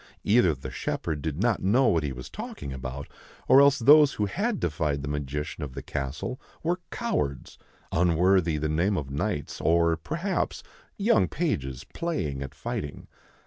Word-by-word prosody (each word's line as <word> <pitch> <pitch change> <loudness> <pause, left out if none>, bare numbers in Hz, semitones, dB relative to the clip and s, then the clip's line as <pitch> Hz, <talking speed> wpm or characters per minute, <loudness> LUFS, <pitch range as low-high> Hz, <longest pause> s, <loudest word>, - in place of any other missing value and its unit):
Either 100 -7 +4
the 65 - -8
shepherd 75 -3 -3
did 80 0 -3
not 115 0 +1
know 120 +7 +3
what 85 -5 +3
he 75 -2 -2
was 65 -1 -7
talking 70 -1 -7
about 65 +2 -6 0.4
or 135 - +8
else 140 0 +6
those 145 +4 +7
who 105 - 0
had 205 - -1
defied 75 -3 -1
the - - -4
magician 75 +2 -3
of 65 -3 -6
the - - -6
castle 75 - -4 0.2
were 175 +3 0
cowards, 200 - -3 0.3
unworthy 90 0 +3
the 75 +1 -1
name 85 +6 +1
of 70 -4 -4
knights, 75 +1 -3
or, 85 0 +3
perhaps, 170 - -2 0.3
young 215 +3 +3
pages 70 - -2
playing 80 - -2
at 70 +1 -7
fighting. 70 0 -5
80 Hz, 160 wpm, -27 LUFS, -, 0.4 s, or